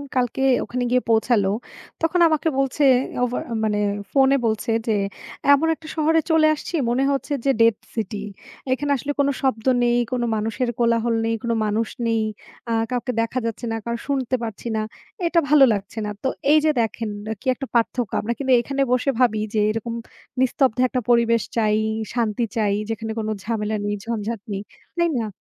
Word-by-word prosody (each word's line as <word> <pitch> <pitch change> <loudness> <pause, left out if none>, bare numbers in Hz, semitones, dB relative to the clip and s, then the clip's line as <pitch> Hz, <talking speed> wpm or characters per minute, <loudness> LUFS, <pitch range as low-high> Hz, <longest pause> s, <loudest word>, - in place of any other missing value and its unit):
কালকে 250 0 0 0.2
ওখানে 250 +1 -3
গিয়ে 250 0 +3
পৌঁছালো, 220 -3 +3 0.5
তখন 330 +2 +1
আমাকে 310 0 0
বলছে, 275 +2 0 0.4
ওভার 250 0 -1 0.2
মানে 210 -1 0 0.3
ফোনে 270 0 +4
বলছে 220 +1 0 0.2
যে, 225 - +2 0.6
এমন 310 +3 +3
একটা 315 - -14
শহরে 320 +1 +3
চলে 315 -1 +5
আসছি, 300 - -8 0.2
মনে 250 +3 +1
হচ্ছে 280 +2 -2
যে 275 - +4
ডেড 230 -1 +5 0.2
সিটি। 210 -2 -3 0.5
এখানে 285 +2 -1
আসলে 280 +3 -3
কোন 280 0 +3
শব্দ 225 -5 0 0.2
নেই। 240 0 +3
কোন 250 -1 -1
মানুষের 225 +3 -1
কোলাহল 230 0 +2
নেই, 225 0 +1
কোন 235 - -1
মানুষ 215 +2 0 0.2
নেই। 225 -1 +1 0.5
আ - - +2 0.2
কাউকে 250 +1 -1
দেখা 230 +3 -1
যাচ্ছে 230 +1 -3
না, - - -1
কারও 235 0 -2
শুনতে 265 -3 0
পারছি 225 +1 -6
না। 215 - 0 0.5
এটা 335 0 +3
ভালো 295 -2 +7
লাগছে 205 +2 -5
না। - - -3
তো - - +1 0.2
এই 310 - +7
যে 310 - +5
দেখেন, 225 0 -2 0.3
কি - - -9
একটা 270 - -6
পার্থক্য? 235 -1 0
আমরা 235 +3 -1
কিন্তু 265 -2 +2
এখানে 275 +3 -2
বসে 250 +2 +1
ভাবি 235 -4 +3 0.2
যে, - - +3
এরকম 225 +1 -4 0.5
নিস্তব্ধ 260 -1 +2
একটা 255 - -1
পরিবেশ 230 -1 +4 0.2
চাই, 215 -2 +3 0.4
শান্তি 230 -1 0
চাই, 205 -2 +2
যেখানে 225 0 -3
কোনো 215 0 -2
ঝামেলা 215 -1 -2
নেই, 205 0 -1
ঝঞ্ঝাট 230 -1 -3
নেই। 195 +1 -4 0.4
তাই 340 0 +3
না? 225 -2 -2
235 Hz, 175 wpm, -22 LUFS, 220-265 Hz, 0.6 s, ভালো